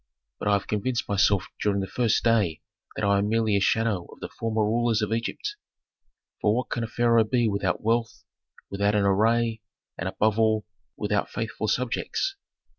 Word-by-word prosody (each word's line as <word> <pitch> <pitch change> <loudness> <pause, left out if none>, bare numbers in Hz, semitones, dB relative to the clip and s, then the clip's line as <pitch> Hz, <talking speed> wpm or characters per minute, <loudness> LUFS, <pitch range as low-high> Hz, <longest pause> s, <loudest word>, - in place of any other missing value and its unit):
But - - -3
I 105 - +4
have 100 - +1
convinced 115 +4 -1
myself 100 -1 +2 0.2
during 100 -1 +1
the 95 - -1
first 115 +2 +1
day 105 -9 +2 0.3
that - - -1
I 100 0 +3
am 100 +1 0
merely 110 -2 +2
a - - +3
shadow 105 -3 +1
of - - -14
the - - -6
former 110 -1 -1
rulers 115 0 +1
of 105 +1 -1
Egypt; 415 - -3 0.8
for 105 0 +3
what 125 - -2
can 120 - -1
a - - -2
pharaoh 115 0 +3
be 120 +1 +1
without 100 -3 -1
wealth, 115 +1 0 0.5
without 100 +1 +1
an 105 - +3
array, 110 +3 +2 0.4
and, - - -2
above 110 +1 +1
all, 110 -1 +2 0.3
without 105 -1 -1
faithful 110 -1 -3
subjects? 125 - -1
110 Hz, 180 wpm, -26 LUFS, 100-115 Hz, 0.8 s, I